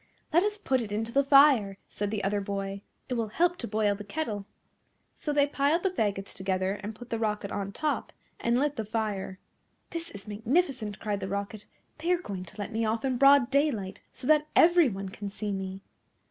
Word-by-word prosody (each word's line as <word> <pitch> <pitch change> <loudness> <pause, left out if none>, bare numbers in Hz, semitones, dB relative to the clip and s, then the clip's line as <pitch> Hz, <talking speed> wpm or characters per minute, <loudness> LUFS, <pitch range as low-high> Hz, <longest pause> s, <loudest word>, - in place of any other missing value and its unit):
"Let 340 - +6
us 415 +1 0
put 265 -11 +1
it 215 -3 -5
into 225 +2 -2
the 280 +3 +3
fire!" 275 -8 +6
said 205 0 -3
the 210 -1 -2
other 200 +1 0
boy, 195 0 -4 0.3
"it 255 - -3
will 230 -2 0
help 350 +10 +1
to 235 - -4
boil 210 -1 +1
the 205 +1 -7
kettle." 210 -5 -4 0.7
So 300 - -3
they 290 -1 +4
piled 290 +4 +1
the 385 - +2
faggots 200 - -1
together, 190 +1 -1
and 210 +1 -6
put 245 +2 -12
the 230 - -1
Rocket 210 -2 -1
on 200 -1 -3
top, 300 +8 -2 0.3
and 235 +1 +2
lit 290 +1 0
the 220 - -1
fire. 210 -3 -3 0.5
"This 335 0 -4
is 200 0 -10
magnificent," 225 - 0
cried 205 -2 -2
the 190 - -4
Rocket, 200 +2 -4 0.3
"they 335 +3 0
are 360 - +4
going 195 - -6
to 175 - -13
let 205 +1 -4
me 225 +1 0
off 225 +2 0
in 255 -2 0
broad 275 -2 +6
daylight, 270 -10 0
so 255 - -6
that 300 +1 +4
everyone 280 - +4
can 200 +1 -6
see 210 +1 -4
me." 190 0 -4
220 Hz, 205 wpm, -28 LUFS, 200-280 Hz, 0.7 s, Let